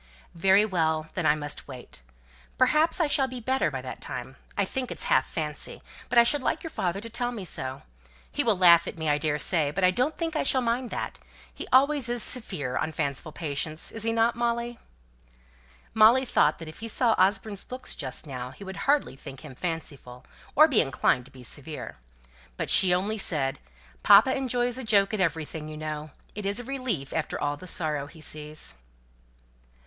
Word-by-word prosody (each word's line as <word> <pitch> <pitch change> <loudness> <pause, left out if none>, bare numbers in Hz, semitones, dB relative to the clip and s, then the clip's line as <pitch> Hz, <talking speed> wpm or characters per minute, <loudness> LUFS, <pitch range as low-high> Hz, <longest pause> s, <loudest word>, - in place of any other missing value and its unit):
"Very 195 +4 +4
well. 160 -5 0
Then 175 -4 0
I 150 - +4
must 145 -1 -6
wait. 125 - -10 0.6
Perhaps 320 +4 +3
I 335 - +3
shall 285 -2 +2
be 255 -1 -7
better 260 -5 0
by 135 -3 -6
that 130 - -8
time. 130 +1 -6 0.2
I 200 - +2
think 255 +5 -4
it's - - -2
half 130 - +2
fancy; 150 -2 -4 0.3
but - - 0
I 235 - +9
should 285 +4 +2
like - - -1
your 325 - -6
father 180 - -2
to 225 - -5
tell 240 +2 -2
me 215 -6 -6
so. 130 -5 -6 0.5
He - - 0
will 220 -4 +2
laugh 170 -2 +6
at - - -6
me, 160 -1 -3
I 145 0 +2
daresay; 150 +1 +1
but 180 +6 -3
I 185 - +6
don't 255 +10 -1
think 330 -1 -3
I - - +1
shall 265 -1 +2
mind 240 +1 -1
that. - - -5 0.3
He - - -7
always 275 -1 +4
is 240 -1 +2
severe 155 - +1
on 160 - -1
fanciful 145 +1 -3
patients, 155 0 -3
isn't 225 +1 +1
he, 225 +1 +4
Molly?" 235 0 -2 1.1
Molly 225 +4 +6
thought 155 -10 +2
that 165 - -9
if 155 - -10
he 230 - -5
saw 230 +1 +2
Osborne's 200 +3 +1
looks 255 0 -2
just 130 0 -4
then 130 -2 -6
he 200 - -12
would 190 -1 -8
hardly 285 - +2
think 135 0 -10
him 150 -3 -10
fanciful, 140 -6 -6 0.3
or 310 +2 +8
be 270 -8 +3
inclined 130 -3 +1
to 135 - -15
be 130 -2 -13
severe. 145 - -5 0.6
But - - -1
she 185 - +8
only 200 +5 0
said, 145 -8 -1 0.4
"Papa 265 - +6
enjoys 245 -2 -1
a - - -5
joke 205 -2 +3
at 210 - 0
everything, 160 -2 -2
you 155 - -8
know. 155 0 -5 0.2
It 205 -1 -4
is 200 +3 -1
a - - -6
relief 245 - -3
after 160 - -2
all 145 0 -1
the 185 +5 -12
sorrow 150 -5 0
he 160 +2 -15
sees." 150 0 -4
185 Hz, 195 wpm, -27 LUFS, 150-235 Hz, 1.1 s, I